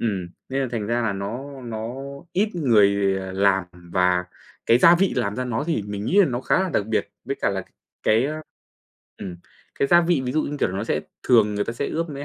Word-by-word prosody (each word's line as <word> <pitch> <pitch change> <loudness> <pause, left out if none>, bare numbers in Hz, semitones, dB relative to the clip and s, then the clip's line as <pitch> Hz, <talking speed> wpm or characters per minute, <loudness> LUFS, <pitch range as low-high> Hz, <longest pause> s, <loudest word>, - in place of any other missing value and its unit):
ừm, 95 -6 -2 0.2
nên 135 +1 -1
là 130 - -2
thành 115 -4 -3
ra 120 +2 0
là 110 -3 0
nó 125 +8 -6
nó 115 0 -5 0.4
ít 205 +4 +2
người, 100 - +3
ờ, 95 0 -6
làm. 95 -1 +2 0.3
Và 90 -1 +2 0.4
cái 115 +1 +5
gia 170 +6 +7
vị 190 +2 +2
làm 100 +1 -1
ra 125 - -2
nó 125 +2 -2
thì 160 -10 0
mình 105 0 -4
nghĩ 185 - +2
là 195 - +5
nó 125 -2 -2
khá 160 - +2
là 190 - -1
đặc 100 - 0
biệt, 110 0 -1
với - - -3
cả - - +2
là - - -2
c - - -20 0.4
cái, 110 +3 +3
ơ 155 +2 -3 0.8
ừm, 90 -3 -6 0.4
cái 140 - 0
gia 175 +3 +7
vị, 170 -3 +2
ví 125 - -2
dụ 155 - +1
như, 145 - -4
kiểu - - +3
là, 95 - -4
nó - - -2
sẽ - - 0 0.2
thường 110 -4 +4
người 105 0 0
ta - - -3
sẽ 130 +4 -3
ướp 165 +1 -2
mới 140 0 -6
115 Hz, 250 wpm, -23 LUFS, 100-140 Hz, 0.8 s, gia